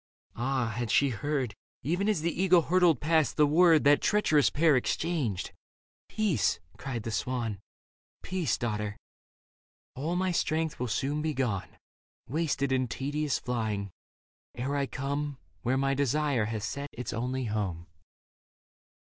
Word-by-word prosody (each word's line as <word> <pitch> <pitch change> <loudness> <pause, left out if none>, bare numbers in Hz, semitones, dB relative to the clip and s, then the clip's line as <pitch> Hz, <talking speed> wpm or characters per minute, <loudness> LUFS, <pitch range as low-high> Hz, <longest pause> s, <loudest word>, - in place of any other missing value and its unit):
Ah, 125 -2 -1
had 120 -1 -2
she 140 +5 +4
heard. 130 -1 -2 0.3
Even 180 - 0
as 200 -7 +1
the 170 +1 0
eagle 180 -3 +5
hurtled 175 -2 +4
past, 160 0 +2
the 150 - +6
word 160 +1 +5
That 145 +1 +5
treacherous 155 -9 +3
pair 155 0 +4
exchanged. 130 - -1 0.3
" - - -75
Peace," 185 - +1 0.2
cried 125 -5 -5
the 115 - -4
swan 115 -3 -2 0.3
*' - - -74
Peace, 175 - -1
daughter. 105 -3 -3 1.0
All 155 +7 -2
my 185 +1 +1
strength 160 -2 0
will 125 - -1
soon 140 +6 -1
be 155 -1 -1
gone. 120 -8 -2 0.5
Wasted 140 -1 0
in 130 -1 +2
tedious 145 +4 -1
flying, 110 -5 -2 0.6
ere 130 +4 -2
I 140 -1 0
come 140 +1 -3 0.2
Where 130 +6 +1
my 135 0 +1
desire 140 -3 +1
hath 110 -1 -3
set 140 +6 -4
its 125 0 -5
only 125 +3 -2
home." 100 -6 -2
140 Hz, 145 wpm, -29 LUFS, 120-155 Hz, 1.0 s, the